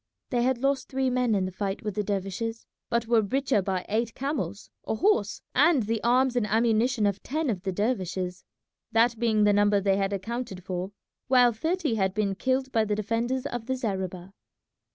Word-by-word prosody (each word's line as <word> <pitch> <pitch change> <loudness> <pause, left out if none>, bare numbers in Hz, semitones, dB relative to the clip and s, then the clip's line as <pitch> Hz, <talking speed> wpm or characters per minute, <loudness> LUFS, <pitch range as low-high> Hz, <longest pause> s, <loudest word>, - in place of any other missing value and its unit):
They 245 -2 +1
had 255 +1 +2
lost 275 +1 0
three 265 -1 0
men 250 -3 +2
in 190 -2 +1
the 185 - -4
fight 195 +1 -3
with 210 -1 -3
the 210 - -1
dervishes, 205 +3 -3 0.2
but 235 0 +1
were 230 -1 +4
the 205 - -4
richer 265 -3 +1
by 185 -1 -2
eight 225 +2 -1
camels, 250 - -4 0.2
a - - 0
horse, 410 - +1
and 320 -8 +4
the 225 +1 -1
arms 250 +2 +3
and 235 -4 +1
ammunition 225 +1 +2
of 200 -1 0
ten 305 -1 -1
of 190 -4 -4
the 190 0 -2
dervishes, 185 -4 -2 0.5
that 230 0 +3
being 220 -3 +2
the 205 0 +5
number 205 0 +4
they 195 0 +2
had 195 0 0
accounted 200 -1 -4
for, 185 +1 -4 0.4
while 250 -2 +5
thirty 320 +4 -1
had 190 -3 0
been 205 -2 +1
killed 260 +5 -1
by 225 -3 +3
the 210 -1 -1
defenders 230 +5 -1
of 240 -4 -4
the 260 - 0
zareba. 190 -6 -4
225 Hz, 195 wpm, -27 LUFS, 195-250 Hz, 0.5 s, the